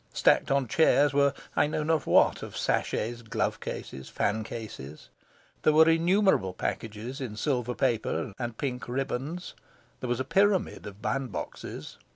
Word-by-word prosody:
Stacked -, -, +3 dB
on 135 Hz, -2 st, +2 dB
chairs 145 Hz, +1 st, +4 dB
were 140 Hz, 0 st, +4 dB, 0.2 s
I -, -, +4 dB
know 155 Hz, 0 st, -2 dB
not 160 Hz, 0 st, 0 dB
what -, -, +4 dB
of -, -, -7 dB
sachets, 120 Hz, +2 st, -1 dB
glove 115 Hz, -, -2 dB
cases, 65 Hz, 0 st, -7 dB
fan 110 Hz, +2 st, 0 dB
cases. 105 Hz, -, -8 dB, 0.5 s
There 155 Hz, -, +4 dB
were 160 Hz, +1 st, +7 dB
innumerable 170 Hz, -, +3 dB
packages 115 Hz, +8 st, -4 dB
in 115 Hz, -5 st, -4 dB
silver 125 Hz, -2 st, -1 dB
paper 120 Hz, -2 st, 0 dB
and 120 Hz, -2 st, -4 dB
pink 125 Hz, -3 st, -3 dB
ribands. 135 Hz, +6 st, -3 dB, 0.5 s
There 125 Hz, -, -4 dB
was 120 Hz, 0 st, 0 dB
a -, -, 0 dB
pyramid 195 Hz, -, +2 dB
of 100 Hz, +1 st, -11 dB
bandboxes. 135 Hz, -5 st, -4 dB
130 Hz, 150 wpm, -28 LUFS, 115-150 Hz, 0.5 s, were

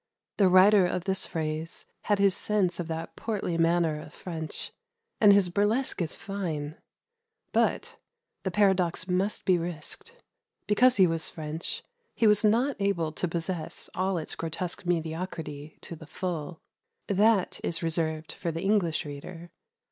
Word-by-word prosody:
The 200 Hz, -, +5 dB
writer 185 Hz, +1 st, +7 dB
of 180 Hz, 0 st, -2 dB
this 190 Hz, 0 st, -2 dB
phrase 160 Hz, +1 st, -4 dB, 0.2 s
had 205 Hz, -, +3 dB
his 200 Hz, -1 st, +3 dB
sense 195 Hz, -5 st, 0 dB
of 175 Hz, -, -3 dB
that 165 Hz, 0 st, -5 dB
portly 210 Hz, -6 st, -2 dB
manner 165 Hz, -2 st, +2 dB
of 155 Hz, -, -12 dB
French, 160 Hz, -3 st, -5 dB, 0.5 s
and 210 Hz, -2 st, +7 dB
his 200 Hz, -3 st, +5 dB
burlesque 205 Hz, +6 st, +1 dB
is 165 Hz, -, -2 dB
fine; 160 Hz, -7 st, -4 dB, 0.8 s
but -, -, 0 dB, 0.4 s
the 190 Hz, -, -2 dB
paradox 185 Hz, -3 st, +2 dB
must 190 Hz, +3 st, 0 dB
be 185 Hz, -3 st, +4 dB
risked 170 Hz, -, -6 dB, 0.5 s
because 250 Hz, +4 st, +4 dB
he 190 Hz, -, +7 dB
was 165 Hz, -2 st, -1 dB
French 155 Hz, +1 st, -4 dB, 0.3 s
he 230 Hz, -, +2 dB
was 210 Hz, 0 st, +5 dB
not 235 Hz, +6 st, +3 dB
able 185 Hz, -6 st, 0 dB
to 180 Hz, -, -2 dB
possess 165 Hz, -1 st, -3 dB
all 190 Hz, 0 st, 0 dB
its 160 Hz, -, -3 dB
grotesque 170 Hz, +2 st, -4 dB
mediocrity 160 Hz, -3 st, -3 dB
to 170 Hz, -, -7 dB
the 160 Hz, -1 st, -12 dB
full; 165 Hz, -1 st, -4 dB, 0.5 s
that 205 Hz, 0 st, +3 dB
is 170 Hz, -, 0 dB
reserved 160 Hz, -1 st, -1 dB
for 170 Hz, -, -3 dB
the 165 Hz, +2 st, -4 dB
English 190 Hz, -5 st, +1 dB
reader. 165 Hz, +4 st, -8 dB
175 Hz, 150 wpm, -28 LUFS, 160-200 Hz, 0.8 s, writer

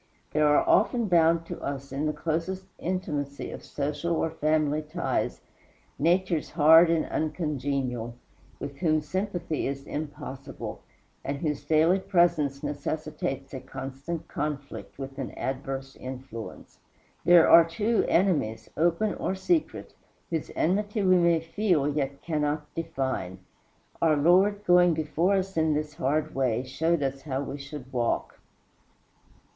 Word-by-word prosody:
There 150 Hz, 0 st, +3 dB
are 145 Hz, -, +4 dB
often 240 Hz, -2 st, +3 dB
bound 165 Hz, -2 st, +4 dB
to -, -, -7 dB
us, 140 Hz, -1 st, -5 dB
in 140 Hz, +3 st, -1 dB
the -, -, +1 dB
closest 165 Hz, +5 st, -3 dB
intimacy 145 Hz, -6 st, -3 dB
of -, -, -8 dB
social 150 Hz, +4 st, -2 dB
or 160 Hz, 0 st, 0 dB
family 155 Hz, -1 st, +1 dB
ties, 155 Hz, +3 st, -2 dB, 0.6 s
natures 170 Hz, 0 st, +1 dB
hard 160 Hz, +2 st, +7 dB
and 165 Hz, -1 st, +2 dB
ungenial, 140 Hz, -7 st, -2 dB, 0.4 s
with 140 Hz, 0 st, -6 dB
whom 155 Hz, -3 st, +2 dB
sympathy 175 Hz, -1 st, -2 dB
is 135 Hz, 0 st, -4 dB
impossible, 140 Hz, -3 st, -6 dB, 0.4 s
and 140 Hz, +1 st, -3 dB
whose 150 Hz, -1 st, -2 dB
daily 165 Hz, +4 st, +3 dB
presence 170 Hz, -7 st, +2 dB
necessitates 145 Hz, -2 st, -4 dB
a 130 Hz, -, -4 dB
constant 135 Hz, +5 st, -6 dB
conflict 145 Hz, -1 st, -5 dB
with 135 Hz, 0 st, -7 dB
an 135 Hz, -, -5 dB
adverse 135 Hz, 0 st, -4 dB
influence. 130 Hz, -3 st, -9 dB, 0.4 s
There 175 Hz, -2 st, +7 dB
are, 170 Hz, -, +9 dB
too, 205 Hz, +8 st, 0 dB
enemies 150 Hz, -, +1 dB
open 175 Hz, +6 st, +1 dB
or 190 Hz, -, -2 dB
secret 320 Hz, -, -1 dB, 0.4 s
whose 160 Hz, -2 st, -2 dB
enmity 205 Hz, +4 st, 0 dB
we 185 Hz, -1 st, +5 dB
may 170 Hz, -2 st, +3 dB
feel 165 Hz, -3 st, +1 dB
yet 140 Hz, -2 st, -2 dB
cannot 150 Hz, -2 st, -2 dB
define. 135 Hz, -, -3 dB, 0.6 s
Our 160 Hz, -2 st, +4 dB
Lord, 190 Hz, +7 st, +4 dB
going 175 Hz, -1 st, +5 dB
before 160 Hz, +5 st, +1 dB
us 190 Hz, -1 st, -2 dB
in 160 Hz, -1 st, +2 dB
this 150 Hz, 0 st, -3 dB
hard 150 Hz, +3 st, -1 dB
way, 125 Hz, -3 st, 0 dB
showed 160 Hz, +4 st, 0 dB
us 135 Hz, 0 st, -2 dB
how 135 Hz, -1 st, -3 dB
we 140 Hz, +1 st, -6 dB
should 140 Hz, -2 st, -9 dB
walk. 120 Hz, -2 st, -1 dB
155 Hz, 135 wpm, -27 LUFS, 140-170 Hz, 0.6 s, are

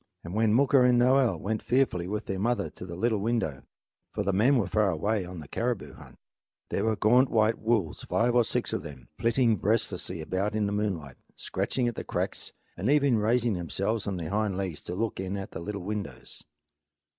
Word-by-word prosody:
And 85 Hz, -, -7 dB
when 110 Hz, 0 st, +2 dB
Mooka 135 Hz, +1 st, +5 dB
and 125 Hz, -1 st, +5 dB
Noel 130 Hz, 0 st, +4 dB
went 110 Hz, +1 st, -2 dB
fearfully 120 Hz, -9 st, +1 dB
with 105 Hz, +2 st, -3 dB
their 95 Hz, -1 st, -3 dB
mother 120 Hz, +4 st, 0 dB
to 90 Hz, -, -10 dB
the 85 Hz, -, -6 dB
little 110 Hz, +3 st, +1 dB
window 100 Hz, -, -1 dB, 0.5 s
for 105 Hz, -, -2 dB
the 100 Hz, 0 st, 0 dB
men 120 Hz, +8 st, +4 dB
were 110 Hz, -, +2 dB
far 105 Hz, -2 st, +2 dB
away 100 Hz, +4 st, 0 dB
on 90 Hz, -1 st, -8 dB
a -, -, -13 dB
caribou 120 Hz, -, -2 dB
hunt -, -, -14 dB, 0.5 s
there 100 Hz, -, -1 dB
were 110 Hz, -1 st, +2 dB
gaunt 125 Hz, +6 st, +4 dB
white 110 Hz, 0 st, +2 dB
wolves, 110 Hz, -7 st, 0 dB
five 120 Hz, +1 st, +1 dB
or 120 Hz, -1 st, +5 dB
six -, -, -1 dB
of -, -, -1 dB
them, 70 Hz, -4 st, -11 dB
flitting 115 Hz, -2 st, +2 dB
restlessly 105 Hz, -5 st, 0 dB
about 95 Hz, +6 st, -2 dB
in 105 Hz, -1 st, +1 dB
the 100 Hz, -, -1 dB
moonlight, 95 Hz, -10 st, -2 dB, 0.2 s
scratching 125 Hz, -2 st, -1 dB
at 120 Hz, -, -1 dB
the -, -, -5 dB
cracks -, -, -3 dB, 0.2 s
and 100 Hz, +8 st, -2 dB
even 140 Hz, -5 st, +4 dB
raising 115 Hz, +2 st, +2 dB
themselves 100 Hz, +5 st, -2 dB
on 95 Hz, -2 st, -2 dB
their 85 Hz, -1 st, -5 dB
hind 105 Hz, -2 st, 0 dB
legs 95 Hz, -6 st, -3 dB
to 90 Hz, -, -6 dB
look 110 Hz, +1 st, -2 dB
in 95 Hz, +1 st, -3 dB
at 95 Hz, -, -6 dB
the -, -, -6 dB
little 100 Hz, +2 st, -5 dB
windows. 105 Hz, +1 st, -6 dB
105 Hz, 205 wpm, -28 LUFS, 95-115 Hz, 0.5 s, Mooka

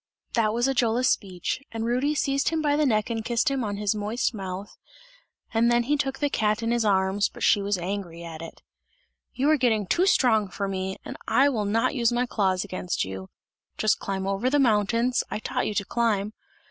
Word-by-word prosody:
That 220 Hz, -3 st, +2 dB
was 240 Hz, +3 st, +1 dB
Ajola's 250 Hz, -1 st, +2 dB
speech, 185 Hz, +4 st, -2 dB
and 225 Hz, 0 st, -3 dB
Rudy 255 Hz, +6 st, +1 dB
seized 275 Hz, -2 st, +1 dB
him 325 Hz, 0 st, -1 dB
by 295 Hz, -2 st, +2 dB
the 300 Hz, -1 st, +2 dB
neck 215 Hz, -1 st, +1 dB
and 225 Hz, -1 st, -2 dB
kissed 240 Hz, +5 st, +1 dB
him 270 Hz, -2 st, -1 dB
on 205 Hz, -2 st, -3 dB
his 205 Hz, 0 st, 0 dB
moist 215 Hz, +4 st, -1 dB
mouth, 195 Hz, -1 st, -6 dB, 0.8 s
and 230 Hz, +1 st, +3 dB
then 240 Hz, 0 st, +3 dB
he 290 Hz, +5 st, +1 dB
took 270 Hz, -2 st, -2 dB
the 290 Hz, -, +1 dB
cat 215 Hz, +1 st, 0 dB
in 230 Hz, -, 0 dB
his 240 Hz, -1 st, +1 dB
arms, 195 Hz, -1 st, +2 dB
but -, -, -9 dB
she 205 Hz, -, +4 dB
was 200 Hz, 0 st, 0 dB
angry 175 Hz, -2 st, -5 dB
at 165 Hz, -1 st, -8 dB
it. 165 Hz, -, -10 dB, 0.7 s
"You 270 Hz, +3 st, +1 dB
are 310 Hz, -, +4 dB
getting 225 Hz, -6 st, +2 dB
too 350 Hz, -, +2 dB
strong 220 Hz, -, +3 dB
for 200 Hz, +2 st, -3 dB
me, 190 Hz, 0 st, -3 dB
and -, -, -7 dB
I 280 Hz, +2 st, +4 dB
will 220 Hz, -6 st, -1 dB
not 220 Hz, +3 st, +1 dB
use 235 Hz, -4 st, +2 dB
my 240 Hz, +1 st, +1 dB
claws 190 Hz, -6 st, 0 dB
against 185 Hz, -, -3 dB
you! 95 Hz, 0 st, -7 dB, 0.5 s
Just 215 Hz, 0 st, +2 dB
climb 190 Hz, -1 st, -3 dB
over 195 Hz, +6 st, 0 dB
the 290 Hz, -, +2 dB
mountains, 230 Hz, 0 st, +2 dB
I -, -, -3 dB
taught 215 Hz, -, -2 dB
you 210 Hz, -, -3 dB
to 200 Hz, -1 st, 0 dB
climb! 215 Hz, -3 st, 0 dB
220 Hz, 210 wpm, -26 LUFS, 195-245 Hz, 0.8 s, she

